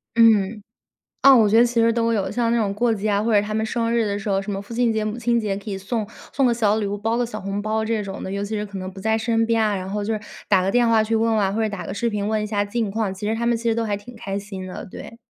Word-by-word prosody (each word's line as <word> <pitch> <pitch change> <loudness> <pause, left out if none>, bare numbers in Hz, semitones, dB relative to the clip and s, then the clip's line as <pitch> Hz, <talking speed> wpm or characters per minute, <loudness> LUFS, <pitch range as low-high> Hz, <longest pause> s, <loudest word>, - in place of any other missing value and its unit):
嗯。 215 -2 +4 0.6
啊， 275 -1 +8
我 215 -3 +5
觉 220 - +4
得 240 - +6
其 235 -1 +1
实 230 0 +4
都 230 0 +1
有， 205 -3 -1
像 235 -1 0
那 235 - +2
种 205 -3 0
过 235 +2 +1
节 210 +1 -2
啊， 200 0 +2
或 225 0 0
者 205 - +5
他 210 +1 -4
们 220 0 0
生 230 0 -1
日 235 -1 +2
的 200 -1 -1
时 205 +1 -5
候， 195 0 +1
什 195 - -7
么 195 0 -3
父 215 +3 -10
亲 240 0 +2
节、 220 -1 0
母 215 +2 -3
亲 240 0 +1
节 205 -3 -1
可 205 +2 -8
以 195 - -3
送 210 +3 -3 0.2
送 275 - +2
个 240 - +3
小 215 -2 +2
礼 210 -2 -1
物， 205 +1 -3
包 225 +3 -1
个 245 - +1
小 220 -2 -7
红 195 +1 -3
包 220 +1 -1
这 220 -1 -1
种 195 -1 -6
的， 190 - -5
尤 200 +1 -2
其 205 +2 -3
是 210 0 -2
可 200 -1 -8
能 185 0 -5
不 190 0 -11
在 220 +2 +1
身 225 0 +1
边 230 -1 +2
啊， 210 -2 +1
然 185 0 -5
后 205 +1 -2
就 215 +2 -1
是 215 - -2 0.3
打 190 -2 +4
个 190 +1 0
电 240 -1 +3
话 225 -1 +4
去 220 +1 -2
问 225 +1 +2
问 220 - +2
啊， 190 - 0
或 215 - -2
者 220 - +2
打 200 -2 -6
个 - - -5
视 235 +3 -1
频 205 -2 -2
问 215 0 0
一 210 - -3
下 205 -1 0
近 215 +1 -2
况， 205 -1 -1
其 205 +2 -5
实 220 - 0
他 235 +1 -2
们 235 -1 +2
其 230 - -9
实 230 -1 +1
都 230 - 0
还 205 -2 -1
挺 240 +4 -12
开 195 -2 -4
心 195 -2 -7
的， 185 - -7
对。 230 - -10
215 Hz, 370 characters per minute, -22 LUFS, 200-230 Hz, 0.6 s, 啊